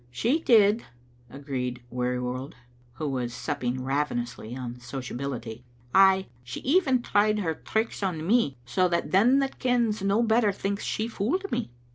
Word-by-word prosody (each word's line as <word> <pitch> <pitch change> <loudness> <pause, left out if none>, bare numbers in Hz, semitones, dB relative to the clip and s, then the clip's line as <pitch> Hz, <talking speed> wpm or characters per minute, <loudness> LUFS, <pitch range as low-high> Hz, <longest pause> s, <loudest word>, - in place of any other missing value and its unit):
"' - - -31 0.2
"She 275 +8 +4
did," 220 -6 +4 0.5
agreed 125 -2 -4
Wearjrworld, 125 +1 -2 0.4
who 150 +5 -4
was 125 -3 -2
supping 125 +1 -2
ravenously 125 -4 -2
on 125 -1 -6
sociability; 125 -2 -5 0.2
" 120 - -29 0.2
ay, 190 0 0 0.2
she 120 0 -6
even 270 -5 +2
tried 210 0 +2
her 170 -6 -1
tricks 220 +8 -2
on 170 -5 -2
me, 200 - +2
so 135 +10 +2
that 170 -1 -1
them 230 +8 +5
that 270 0 -3
kens 235 -4 +1
no 200 +4 +2
better 225 -2 +3
thinks 200 +1 -3
she 220 - -1
fooled 280 - -2
me. - - -1
170 Hz, 155 wpm, -27 LUFS, -, 0.5 s, them